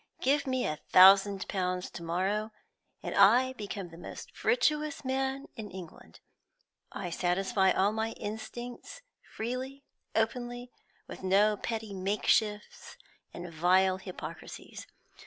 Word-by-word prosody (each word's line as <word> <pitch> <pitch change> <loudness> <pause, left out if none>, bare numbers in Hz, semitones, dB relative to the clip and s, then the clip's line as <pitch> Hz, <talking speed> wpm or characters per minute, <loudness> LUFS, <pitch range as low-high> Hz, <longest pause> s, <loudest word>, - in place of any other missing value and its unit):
Give 280 +2 +1
me 260 -1 0
a 155 -1 -2
thousand 195 +1 +7
pounds 180 -1 -2
to - - -8
morrow, 190 +6 -1 0.5
and - - -4
I 240 +6 +5
become 200 -5 -6
the 165 0 -13
most - - -9
virtuous 305 - +1
man 265 +1 -1
in 215 -2 -7
England. 180 -3 -11 0.7
I 185 -4 -5
satisfy 190 +2 +1
all 195 +3 +2
my 220 +1 -2
instincts 240 - -7 0.3
freely, 255 +4 -5 0.3
openly, 245 +2 -2 0.4
with - - -9
no 200 +3 +3
petty 220 -1 -4
makeshifts 210 +2 0 0.3
and 175 -1 -8
vile 185 +3 +3
hypocrisies. 190 -1 -9
210 Hz, 120 wpm, -30 LUFS, 190-245 Hz, 0.7 s, thousand